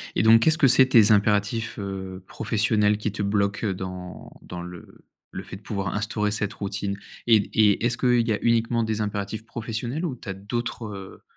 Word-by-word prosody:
Et - - +2
donc, 115 +1 +7
qu'est-ce 160 +5 +3
que 140 -5 +5
c'est, 130 +1 +7
tes 110 -4 +6
impératifs, 105 +2 +1
heu, 95 -1 -6
professionnels, 105 -1 +1
qui 105 -1 -3
te 105 - -5
bloquent, 100 +1 0
heu, 95 - 0
dans 90 -1 -8
dans 90 -1 -8
le 90 -1 -12 0.3
le - - -6
fait - - -9
de 100 - -12
pouvoir 100 -4 -3
instaurer 105 0 -1
cette 105 -1 -2
routine? 100 0 -4 0.3
Et 115 -2 +6
d 100 - -4
et 105 0 +3
est-ce 120 0 0
qu'il 125 -2 +2
y 110 - +2
a 105 - 0
uniquement 115 0 +2
des 110 -1 -2
impératifs 105 +1 -4
professionnels 120 +7 -4
ou 140 - -3
tu 120 - -15
as 95 - -2
d'autres, 115 +4 -4
heu, 95 -2 -9
105 Hz, 205 wpm, -24 LUFS, 100-115 Hz, 0.3 s, donc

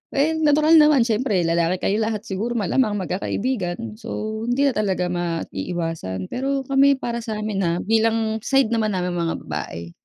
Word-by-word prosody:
Eh, 290 +4 +3
natural 305 +1 +5
naman 300 -5 +5
siyempre 220 -5 0
lalaki 170 +2 0
kayo 210 - +1
lahat 215 -1 -1
siguro 220 +5 -3
malamang 215 +1 +1
magkakaibigan, 205 +2 -3
so 220 -1 -5
hindi 260 +4 +2
na - - -8
talaga 185 -4 -1
maiiwasan, 165 - -3
pero 270 +1 -1
kami 275 +1 +4
para 235 -2 -4
sa'min 215 -3 -3
ha 170 -3 +1
bilang 225 0 +1
side 270 0 +2
naman 215 -3 0
naming 180 -1 -2
mga 165 -1 -1
babae. 85 +1 -6
215 Hz, 155 wpm, -22 LUFS, 180-245 Hz, -, natural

